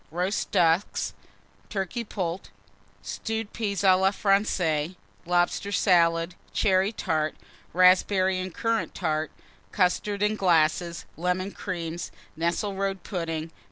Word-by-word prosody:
Roast 180 +5 -1
Ducks. 175 0 +2 0.6
Turkey 200 +4 -3
Poult. 185 -4 -4 0.5
Stewed 225 -1 -4
Peas 200 -4 -2
à 190 -1 +7
la 190 - +5
Francaise. 185 -5 +1 0.3
Lobster 175 +3 +1
Salad. 170 -3 +3 0.2
Cherry 190 0 +2
Tart. 155 -7 -1 0.4
Raspberry 185 +1 +4
and 185 0 -4
Currant 230 +4 -1
Tart. 155 -3 -1 0.4
Custards, 200 +3 +1
in 210 +1 +1
glasses. 170 -1 +2
Lemon 180 +3 -1
Creams. 170 -4 -5 0.3
Nesselrode 195 +3 -1
Pudding. 165 -3 -3
185 Hz, 105 wpm, -26 LUFS, 170-200 Hz, 0.6 s, à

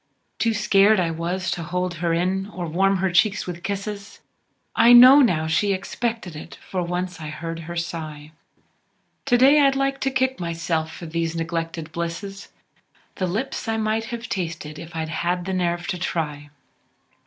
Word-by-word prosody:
Too 225 -1 +1
scared 210 0 +4 0.2
was 175 +1 -1
I - - -3
to 170 - -5
hold 180 +2 -2
her 170 -1 +1
in, 185 +3 0
or 180 -4 -6
warm 195 +4 +2
her 190 0 0
cheeks 200 +4 +2
with 175 -1 -6
kisses, 200 +1 -5 0.6
I 235 +2 +7
know, 255 +4 +10
now, 175 - +3
she 195 +6 +1
expected 210 -1 -3
it, 150 - -9
for 185 - -2
once 180 0 -3
I 155 - -5
heard 165 +2 -5
her 170 +1 -7
sigh 155 -3 -5 0.9
To 245 -3 +4
day 275 +4 +6
I'd 275 -1 +4
like 275 0 0
t' 270 - +1
kick 260 0 0
myself 165 -2 -2
for 170 - -9
these 165 0 -2
neglected 165 -1 -3
blisses, 170 +4 -5 0.7
The 185 - -1
lips 225 +7 -3
I 225 0 0
might 220 +1 0
have 235 0 -6
tasted 165 -4 -4
if 165 0 -10
I'd 160 -1 -3
had 175 +2 -1
the 190 - -3
nerve 175 -1 -1
t' 180 - -3
try. 150 -5 -3
180 Hz, 175 wpm, -23 LUFS, 165-210 Hz, 0.9 s, know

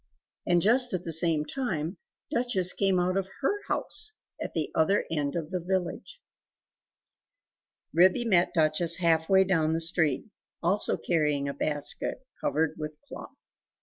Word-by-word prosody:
And 175 -1 +3
just 245 +1 +4
at 180 - -4
the 165 - -1
same 160 -2 +3
time, 185 - -3 0.3
Duchess 235 -7 +1
came 195 -2 +2
out 180 +1 0
of 190 -1 -2
HER 405 +9 0
house, 435 - -2 0.3
at - - -5
the 155 -3 -2
other 195 +6 +2
end 145 -2 -1
of 165 -1 -4
the 185 - -1
village. 185 - -3 1.7
Ribby 185 +8 +4
met 180 -6 +3
Duchess 160 +1 +2
half 165 -2 +1
way 190 0 +5
own 160 -3 +2
the 165 - 0
street, 160 -4 +1 0.4
also 195 +5 +2
carrying 150 -4 0
a 140 - -3
basket, 145 - -1 0.2
covered 160 0 0
with 150 0 -5
a 285 - -39
cloth. - - -10
175 Hz, 150 wpm, -28 LUFS, 155-190 Hz, 1.7 s, way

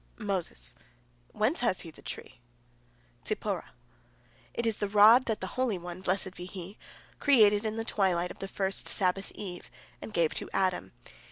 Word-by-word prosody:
Moses: 185 - -2 0.6
"Whence 220 +9 +1
has 235 -6 +1
he 165 - -9
the - - -17
tree?" 130 - -8 0.8
Zipporah: 60 - -2 0.8
"It 235 - -2
is 225 -2 0
the 205 - -2
rod 215 +5 +7
that 220 -2 -2
the - - -2
Holy 255 -6 0
One, 175 +1 -7
blessed 190 0 -1
be 180 - -8
He, 185 +1 -8 0.4
created 215 -6 +5
in 215 - -3
the 225 0 -3
twilight 180 -5 +1
of - - -12
the 195 - -4
first 195 0 0
Sabbath 195 +1 +1
eve, 180 -4 -7 0.3
and - - -7
gave 170 -5 +2
to - - -2
Adam. 185 -2 0
195 Hz, 165 wpm, -30 LUFS, 180-215 Hz, 0.8 s, rod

